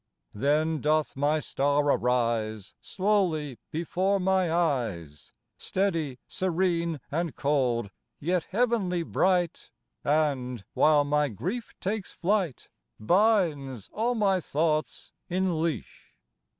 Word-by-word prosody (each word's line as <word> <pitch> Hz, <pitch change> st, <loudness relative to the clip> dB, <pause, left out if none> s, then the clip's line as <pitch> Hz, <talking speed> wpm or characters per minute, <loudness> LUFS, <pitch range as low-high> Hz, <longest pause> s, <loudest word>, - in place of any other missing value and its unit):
Then 150 Hz, +6 st, +1 dB
doth 155 Hz, 0 st, +1 dB
my 145 Hz, +3 st, +2 dB
star 145 Hz, 0 st, +1 dB
arise 115 Hz, -6 st, 0 dB
Slowly 180 Hz, -, 0 dB
before 185 Hz, +5 st, 0 dB
my 185 Hz, -2 st, +2 dB
eyes, 115 Hz, -, -1 dB, 0.3 s
Steady, 165 Hz, -9 st, -1 dB
serene 170 Hz, -3 st, 0 dB
and 165 Hz, +1 st, -2 dB
cold, 125 Hz, -7 st, 0 dB, 0.3 s
yet 175 Hz, +2 st, 0 dB
heavenly 200 Hz, -5 st, 0 dB
bright, 180 Hz, 0 st, 0 dB, 0.3 s
And, 135 Hz, -7 st, 0 dB
while 150 Hz, -1 st, +4 dB
my 150 Hz, 0 st, +1 dB
grief 190 Hz, -, -5 dB
takes 205 Hz, 0 st, -3 dB
flight, 185 Hz, -, -1 dB, 0.3 s
Binds 150 Hz, -, +1 dB
all 235 Hz, +3 st, 0 dB
my 195 Hz, -4 st, +2 dB
thoughts 155 Hz, -1 st, -1 dB, 0.2 s
in 180 Hz, -3 st, 0 dB
leash. 160 Hz, -, -4 dB
155 Hz, 100 wpm, -27 LUFS, 140-185 Hz, 0.3 s, while